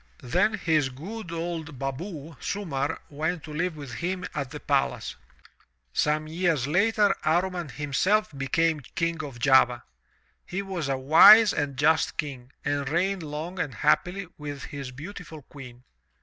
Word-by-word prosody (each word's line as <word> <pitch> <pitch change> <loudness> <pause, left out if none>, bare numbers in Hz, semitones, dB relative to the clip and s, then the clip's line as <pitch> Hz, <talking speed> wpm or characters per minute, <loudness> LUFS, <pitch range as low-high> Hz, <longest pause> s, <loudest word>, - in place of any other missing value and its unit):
Then 180 - +2
his 160 -8 +1
good 175 - -8
old 165 -3 -4
baboo, 150 +4 -5
Sumarr, 160 -7 -2
went 160 +3 -2
to 155 - -8
live 165 +1 -2
with 140 -5 -8
him 180 +3 -3
at 140 -3 -3
the - - -7
palace. - - -1 0.8
Some 155 - +1
years 165 -4 0
later, 205 +6 +3
Amman 175 0 0
himself 150 - 0
became 155 +4 +1 0.2
King 165 -1 -1
of 140 -5 -7
Java. 125 0 +4 0.6
He 195 +2 -4
was 180 -7 -4
a 135 - 0
wise 175 +10 +8
and 145 -3 -2
just 155 +3 +2
King 135 -4 -5
and 145 -1 -1
reigned 185 +4 0
long 160 +4 -6
and 145 -9 -2
happily 180 - +1
with 145 -2 -6
his 140 -3 -6
beautiful 155 +2 -9
Queen. 125 -3 -12
155 Hz, 145 wpm, -26 LUFS, 140-180 Hz, 0.8 s, wise